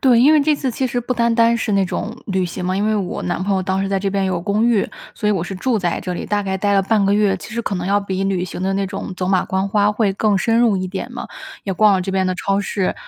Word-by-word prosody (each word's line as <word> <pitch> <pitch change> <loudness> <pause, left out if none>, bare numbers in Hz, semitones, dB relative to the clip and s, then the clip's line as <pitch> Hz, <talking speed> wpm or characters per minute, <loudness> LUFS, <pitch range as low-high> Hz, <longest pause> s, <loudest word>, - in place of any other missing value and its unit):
对， 245 -3 +5
因 285 +5 +6
为 305 - +5
这 300 +1 +3
次 270 -3 -2
其 260 +3 -1
实 245 0 -2
不 245 +2 -2
单 235 -1 +1
单 230 0 +4
是 225 -2 -2
那 195 -1 +3
种 215 +5 -4
旅 190 -2 0
行 180 +1 -5
嘛， 185 +1 0
因 205 +2 0
为 215 - +2
我 195 -4 -2
男 180 +1 -2
朋 195 0 0
友 190 - 0
当 190 +1 -1
时 195 - -2
在 195 -1 0
这 195 +1 -1
边 195 0 0
有 185 -2 -1
公 205 +5 0
寓， 230 -5 +2 0.3
所 210 -2 -1
以 - - +3
我 185 -4 -1
是 195 - -5
住 230 +4 0
在 175 -3 -1
这 180 -1 -4
里， - - -5
大 205 -1 0
概 190 -1 -2
待 205 +1 0
了 195 - +4
半 205 0 +2
个 200 - +2
月。 205 -2 +2
其 215 - -10
实 235 - -2
可 210 - -3
能 180 0 -3
要 200 +1 +3
比 195 -1 -3
旅 190 -2 0
行 180 0 -6
的 190 - 0
那 195 0 0
种 185 - -6
走 180 0 -2
马 185 -1 +2
观 190 +1 -1
花 205 0 +3
会 210 -2 +1
更 205 0 +1
深 225 +3 +2
入 225 -5 +3
一 185 0 -2
点 190 +1 -5
嘛， - - -6 0.4
也 195 - -1
逛 210 +2 +4
了 190 - +1
这 190 +1 -3
边 190 -1 +1
的 185 - 0
超 195 +2 0
市 200 -2 -1
200 Hz, 345 characters per minute, -19 LUFS, 190-215 Hz, 0.4 s, 因